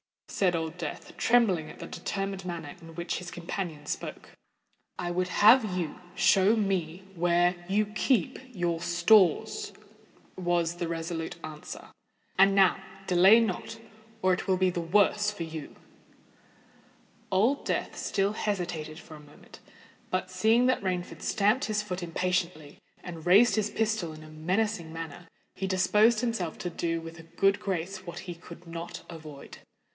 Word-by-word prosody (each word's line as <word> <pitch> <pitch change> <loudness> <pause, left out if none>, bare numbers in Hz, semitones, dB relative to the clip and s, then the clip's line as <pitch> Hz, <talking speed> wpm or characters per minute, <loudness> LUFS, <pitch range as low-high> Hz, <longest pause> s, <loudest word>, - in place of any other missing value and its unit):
said 180 -3 +1
Old 165 +1 -3
Death, - - -6
trembling 200 -10 +3
at - - -11
the - - -7
determined 195 -1 -4
manner 170 -5 -6
in 165 -1 -12
which 170 +1 -3
his 180 0 -7
companion 170 -3 -5
spoke. - - -5 0.7
"I 175 - -3
would 180 +1 0
have 210 0 +5
you 170 -1 -3 0.2
show 195 +3 +4
me 190 -4 -1
where 175 0 +3 0.2
you 210 +2 +2
keep 215 0 0 0.2
your 170 -2 -1
stores," 175 +1 +3 0.6
was 175 -2 0
the 175 - -2
resolute 165 0 -4
answer. 155 -1 -8 0.5
"And 195 0 +6
now—delay 195 +2 +4
not—or 220 0 -3
it 180 - -3
will 190 -1 +3
be 185 0 +2
the 175 - -3
worse 205 +4 +3
for 205 -5 -5
you." 160 -2 -7 1.6
Old 225 +9 +2
Death - - -2
still 200 +1 0
hesitated 175 -8 -3
for 165 - -12
a 155 - -10
moment; 150 0 -16 0.5
but, 185 0 -2
seeing 220 +6 +3
that 255 - +2
Rainford 185 -2 -3
stamped 215 +5 +2
his 210 -1 -1
foot 185 -3 -4
impatiently 170 -3 -2 0.2
and 170 -1 -8
raised 205 +7 +6
his 215 -1 0
pistol 215 -8 -1
in 155 0 -11
a 155 - -12
menacing 175 +3 -1
manner, 165 +1 -7 0.3
he 190 - -3
disposed 210 +5 +4
himself 225 -9 -2
to 175 - -4
do 165 0 -1
with 165 0 -9
a - - -11
good 195 +4 +1
grace 190 0 -4
what 170 0 -6
he 180 -2 -6
could 170 +1 -13
not 165 0 -7
avoid. 155 -4 -10
180 Hz, 150 wpm, -28 LUFS, 165-200 Hz, 1.6 s, And